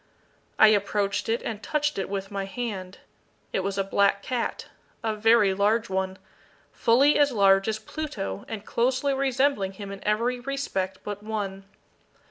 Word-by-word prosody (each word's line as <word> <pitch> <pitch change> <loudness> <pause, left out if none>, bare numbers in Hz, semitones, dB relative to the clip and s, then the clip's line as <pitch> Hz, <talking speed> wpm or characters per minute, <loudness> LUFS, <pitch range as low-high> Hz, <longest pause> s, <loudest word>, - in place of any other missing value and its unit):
I 220 - +8
approached 205 0 0
it, 230 - 0
and 215 -2 -4
touched 295 -5 -1
it 190 - -3
with 195 0 -4
my 195 -1 -3
hand. 195 -4 -5 0.6
It - - +1
was 195 +1 -2
a 195 - +2
black 200 +1 +2
cat 250 -2 -2 0.4
a 220 -1 0
very 215 -2 +4
large 210 +2 +1
one 190 0 -1 0.5
fully 270 +6 +4
as 290 -1 +4
large 195 -3 +4
as 220 -1 0
Pluto, 220 - -5
and 215 -2 -6
closely 260 +3 +1
resembling 265 -6 +1
him 200 0 -8
in 195 - -8
every 235 +4 0
respect 245 -8 -3
but 205 -1 -5
one. 200 -3 -4
210 Hz, 155 wpm, -26 LUFS, 195-245 Hz, 0.6 s, I